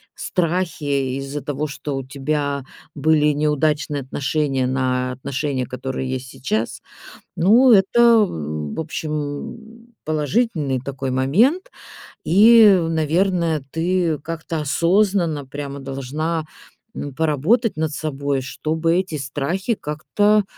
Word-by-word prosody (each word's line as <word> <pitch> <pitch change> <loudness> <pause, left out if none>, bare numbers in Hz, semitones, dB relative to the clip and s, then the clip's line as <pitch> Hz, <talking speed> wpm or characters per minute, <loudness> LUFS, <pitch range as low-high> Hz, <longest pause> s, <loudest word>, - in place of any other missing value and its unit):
страхи 155 -7 -1
из-за 140 +1 -5
того, 145 +2 -3
что 145 -1 -5
у 135 - -4
тебя 140 +1 -2 0.3
были 150 +1 +3
неудачные 150 0 0
отношения 135 -1 -1
на 130 -1 0
отношения, 135 0 -3
которые 130 +1 -4
есть 130 0 -4
сейчас. 115 -2 -3 0.6
Ну, 230 +9 +5
это, 205 +2 +5 0.3
м, 75 - -5
в - - -3
общем, 160 +11 -6
положительный 155 - 0
такой 135 0 -4
момент. 225 - +2 0.5
И, 215 +5 +7 0.2
наверное, 165 0 +1
ты 170 -2 0
как-то 165 +1 -5
осознанно 170 0 +1
прямо 140 0 -6
должна, 145 +5 -3 0.5
м, 140 -2 -6
поработать 160 - +1
над 160 0 -1
собой, 140 -2 -2
чтобы 160 +5 -1
эти 185 -5 -2
страхи 145 - -2
как-то, 205 +7 +1
150 Hz, 110 wpm, -21 LUFS, 135-170 Hz, 0.6 s, И